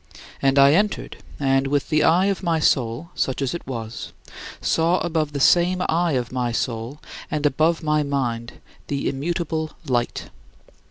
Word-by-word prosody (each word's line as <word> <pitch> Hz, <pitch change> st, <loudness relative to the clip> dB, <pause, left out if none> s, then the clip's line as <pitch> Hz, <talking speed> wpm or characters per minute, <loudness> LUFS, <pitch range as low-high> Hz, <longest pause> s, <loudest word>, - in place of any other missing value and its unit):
And 135 Hz, 0 st, +2 dB
I 140 Hz, +1 st, +7 dB
entered, 205 Hz, +4 st, 0 dB, 0.2 s
and 135 Hz, -1 st, +2 dB
with 145 Hz, 0 st, 0 dB
the 155 Hz, -1 st, +3 dB
eye 175 Hz, +4 st, +4 dB
of 200 Hz, -1 st, 0 dB
my 170 Hz, -3 st, +1 dB
soul 130 Hz, +2 st, 0 dB
such 130 Hz, -, -1 dB
as 135 Hz, -2 st, -1 dB
it 170 Hz, -, -7 dB
was 115 Hz, -3 st, -6 dB, 0.5 s
saw 165 Hz, +2 st, +2 dB
above 160 Hz, -3 st, -1 dB
the 140 Hz, -, -4 dB
same 180 Hz, +5 st, +4 dB
eye 170 Hz, 0 st, +1 dB
of 125 Hz, -2 st, -1 dB
my 125 Hz, -2 st, -1 dB
soul 115 Hz, +4 st, -3 dB, 0.3 s
and 150 Hz, -1 st, -2 dB
above 155 Hz, +4 st, +2 dB
my 150 Hz, 0 st, +2 dB
mind 125 Hz, -5 st, -2 dB, 0.3 s
the 140 Hz, -1 st, -2 dB
Immutable 160 Hz, +2 st, -2 dB
Light. 120 Hz, -4 st, -2 dB
145 Hz, 160 wpm, -23 LUFS, 130-165 Hz, 0.5 s, I